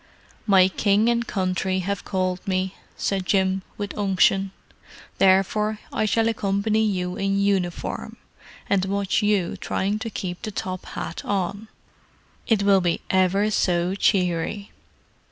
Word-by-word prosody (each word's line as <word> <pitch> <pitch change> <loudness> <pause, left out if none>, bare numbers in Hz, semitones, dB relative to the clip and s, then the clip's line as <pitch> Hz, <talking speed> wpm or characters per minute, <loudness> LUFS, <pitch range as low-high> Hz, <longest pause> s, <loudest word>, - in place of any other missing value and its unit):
"My 190 -2 +6
King 205 +3 +2
and 235 0 0
Country 185 -1 -1
have 200 +1 -3
called 185 0 -2
me," 185 0 0 0.2
said 195 -2 -1
Jim, 190 0 +1 0.2
with 205 -1 -5
unction. 195 -1 +2 0.7
"Therefore 195 +3 +3 0.2
I - - +1
shall 225 +1 +2
accompany 215 -1 +1
you 180 -4 -1
in 195 0 0
uniform—and 195 0 -2
watch 200 0 0
you 205 -4 +1
trying 200 +3 -1
to 225 0 -4
keep 180 -4 -5
the - - -4
top 185 -2 -5
hat - - -6
on. 200 +2 -2 0.8
It 215 -3 +2
will 200 -1 +5
be 175 -1 0
ever 190 +3 +2
so 180 -2 +1
cheery." 195 0 0
195 Hz, 130 wpm, -24 LUFS, 185-205 Hz, 0.8 s, My